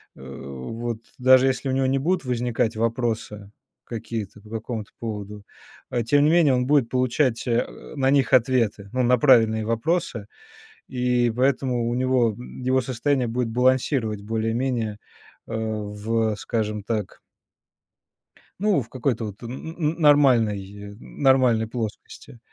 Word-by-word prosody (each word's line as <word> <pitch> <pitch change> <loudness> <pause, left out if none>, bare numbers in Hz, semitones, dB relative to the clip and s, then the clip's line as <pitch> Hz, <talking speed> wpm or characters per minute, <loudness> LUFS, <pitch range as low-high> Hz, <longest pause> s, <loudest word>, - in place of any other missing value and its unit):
э, - - -15
вот 70 - -6 0.2
даже 130 +1 +5
если 135 +1 -1
у - - +1
него 130 0 +1
не 135 +1 +1
будут 170 +3 0
возникать 120 -2 -1
вопросы 115 -3 -2 0.3
какие-то 110 -3 -6
по 105 - -16
какому-то 110 -1 -5
поводу, 105 -2 -6 0.4
а 120 - -1
тем 145 +5 +3
не - - +4
менее 165 -5 +4
он 125 0 +1
будет 140 -5 +3
получать, 125 0 0
а, 115 0 -2
на 135 -2 +1
них 140 -2 +2
ответы, 115 -5 +2
ну, 130 - 0
на 125 +1 +4
правильные 115 -4 +4
вопросы, 115 - -1 0.6
и 125 -2 +1
поэтому 125 -2 +1
у 120 - -1
него, 125 -2 +2
м, 125 - -10
его 130 +1 +2
состояние 130 +1 0
будет 120 0 -1
балансировать 125 -3 +1
более-менее, 115 0 -2 0.5
а, - - -7
в, 110 0 -2
скажем 105 -2 -3
так 105 -4 -3 1.4
Ну, 205 -7 +2
в 115 - -11
какой-то 125 -3 -2
вот 105 -1 -8
н 120 - -6
н 160 +5 -7
н 160 -1 0
нормальной 105 -9 +2
нормальной 130 -6 +2
плоскости. 115 +1 -7
120 Hz, 140 wpm, -24 LUFS, 110-130 Hz, 1.4 s, даже